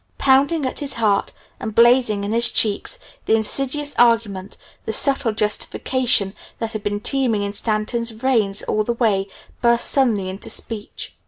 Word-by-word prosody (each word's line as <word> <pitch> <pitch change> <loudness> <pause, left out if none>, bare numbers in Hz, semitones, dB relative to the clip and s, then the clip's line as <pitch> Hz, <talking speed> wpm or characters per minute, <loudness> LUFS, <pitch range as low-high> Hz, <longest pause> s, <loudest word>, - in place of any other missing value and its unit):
Pounding 275 +3 +2
at 260 - -2
his 285 -2 -3
heart, 210 -3 +1 0.3
and 220 -1 -6
blazing 235 -3 +4
in 200 - -3
his 235 +1 +3
cheeks, 215 - 0 0.3
the 220 - +4
insidious 275 +6 0
argument, 225 -5 +1 0.3
the - - -2
subtle 270 0 +3
justification, 210 0 0 0.2
that 225 -1 -4
had 215 -2 -5
been 205 0 -3
teeming 235 -3 0
in 200 0 -4
Stanton's 220 +2 -1
veins 220 -4 0
all 215 - -1
the 235 - -2
week, 205 -5 0 0.3
burst 235 0 +3
suddenly 230 -9 +1
into 190 +2 -6
speech. 215 -2 -4
225 Hz, 155 wpm, -20 LUFS, 210-255 Hz, 0.3 s, blazing